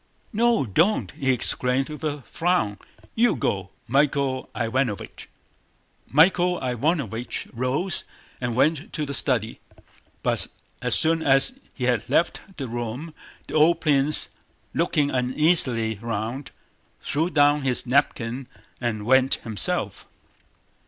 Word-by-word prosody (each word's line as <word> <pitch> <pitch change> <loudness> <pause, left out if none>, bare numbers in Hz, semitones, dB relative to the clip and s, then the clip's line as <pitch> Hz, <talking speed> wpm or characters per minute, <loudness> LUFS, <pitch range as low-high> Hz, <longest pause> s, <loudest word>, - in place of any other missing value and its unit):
"No, 230 - +2
don't!" 125 - +1
he 135 - -3
exclaimed 125 +2 0
with 150 +1 -8
a 145 -3 -3
frown. 165 - 0 0.3
"You 230 -4 +3
go, 95 -6 -2 0.2
Michael 135 0 +1
Ivánovich." 120 -2 -2 0.8
Michael 175 +4 +3
Ivánovich 125 - -2
rose 135 +9 -1 0.4
and 120 -2 -2
went 155 +4 +1
to 155 - -2
the 140 - -5
study. 115 -5 +2 0.6
But - - 0 0.3
as - - +1
soon 165 +1 +2
as 140 - +3 0.2
he 125 - -5
had 125 -3 0
left 170 - +1 0.2
the 135 -3 -4
room 120 +7 -5 0.3
the - - -10
old 160 +2 +4
prince, 145 -1 +4 0.4
looking 145 -1 +1
uneasily 125 - +2
round, 115 +4 -4 0.5
threw 160 +4 0
down 145 -2 +3
his 130 -3 +1
napkin 125 -1 0 0.3
and 110 -4 -3
went 130 +2 +4
himself. 110 -3 -2
135 Hz, 120 wpm, -24 LUFS, 120-155 Hz, 0.8 s, old